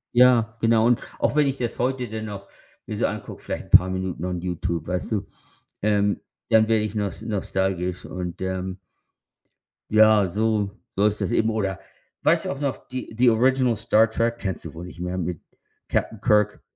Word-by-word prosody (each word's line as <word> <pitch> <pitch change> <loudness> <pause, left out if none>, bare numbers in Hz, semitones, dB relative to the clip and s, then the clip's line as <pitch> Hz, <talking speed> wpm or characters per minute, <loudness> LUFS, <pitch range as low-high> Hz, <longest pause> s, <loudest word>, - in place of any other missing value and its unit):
Ja, 120 -3 +5
genau 115 0 +4
und 120 - +3 0.2
auch - - +1
wenn 145 -2 +4
ich 135 0 -1
das 120 -2 -3
heute 125 -1 -1
dann 110 0 -5
noch 100 -2 -8 0.4
mir - - -5
so - - +1
angucke, - - -5
vielleicht - - -5
'n - - -22
paar 95 +1 +7
Minuten 95 -2 -3
on 90 -2 -3
YouTube, 85 -2 -3
weißt 90 +5 -2
du, 100 -1 -1 0.6
ähm, 105 -1 +2 0.3
dann 110 -1 +5
werde 110 -1 +2
ich 110 0 -4
nos 100 0 -2
nostalgisch. 95 -4 -2
Und, 90 -1 -6
ähm 95 0 -3 1.1
ja, 110 -2 +6
so 105 +1 0 0.3
so 100 +2 +2
ist 105 0 -1
das - - -1
eben. 110 -1 +2
Oder 100 -4 -1 0.4
weißt - - +3
du - - -2
auch 140 +1 -6
noch 140 -2 -3
die 130 -2 -6
„The 125 0 +6
Original 125 +1 +3
Star 110 +1 +3
Trek“? 115 +1 0
Kennst 95 -5 -4
du - - -8
wohl 85 +2 -8
nicht 90 -1 -10
mehr 90 +1 -3
mit 90 -2 -3 0.5
Captain 110 -2 -1
Kirk. 105 -3 +2
105 Hz, 190 wpm, -24 LUFS, 95-115 Hz, 1.1 s, paar